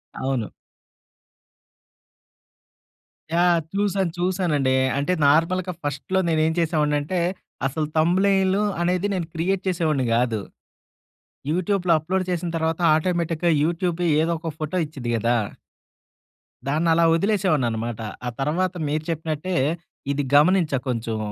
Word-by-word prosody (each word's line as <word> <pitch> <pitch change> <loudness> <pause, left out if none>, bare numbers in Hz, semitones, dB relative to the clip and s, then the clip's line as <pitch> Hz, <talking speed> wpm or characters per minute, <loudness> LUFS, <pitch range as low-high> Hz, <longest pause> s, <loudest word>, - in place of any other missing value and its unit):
అవును. 130 -5 -2 2.9
యాహ్! 175 -1 +4
చూసాను. 195 -3 0
చూసానండి. 175 -8 +1 0.2
అంటే 145 +6 0
నార్మల్‌గా 170 +5 +2
ఫస్ట్‌లో 145 +7 -1
నేను 160 -1 +2
ఏం 160 - +1
చేసేవాడిని 155 -3 +1
అంటే 180 +5 -2 0.5
అసలు 150 +2 -2
థంబ్‌నెయిలు 190 +4 +3 0.2
అనేది 180 +3 +1
నేను 180 -4 -2
క్రియేట్ 180 +3 -1
చేసేవాడిని 155 -7 +1
కాదు. 120 -2 +1 1.1
యూట్యూబ్‌లో 180 0 +1
అప్లోడ్ 185 +4 -1
చేసిన 175 0 -2
తర్వాత 160 +1 -1 0.2
ఆటోమేటిక్‌గా 170 0 0
యూట్యూబే 175 +1 0
ఏదో 165 +1 +1
ఒక 165 -1 -4
ఫోటో 155 +4 -2
ఇచ్చిద్ధి 130 -6 -5
గదా! 120 +2 +1 1.3
దాన్నలా 165 +3 +2
వదిలేసేవాడిని 185 - +1
అన్నమాట. 115 0 -4 0.3
ఆ - - 0
తరువాత 170 +7 0
మీరు 150 +1 -1
చెప్పినట్టే 160 +2 -2 0.6
ఇది 140 0 -1
గమనించా 155 -1 +4
కొంచెం. 115 -2 -2
165 Hz, 110 wpm, -23 LUFS, 145-180 Hz, 2.9 s, యాహ్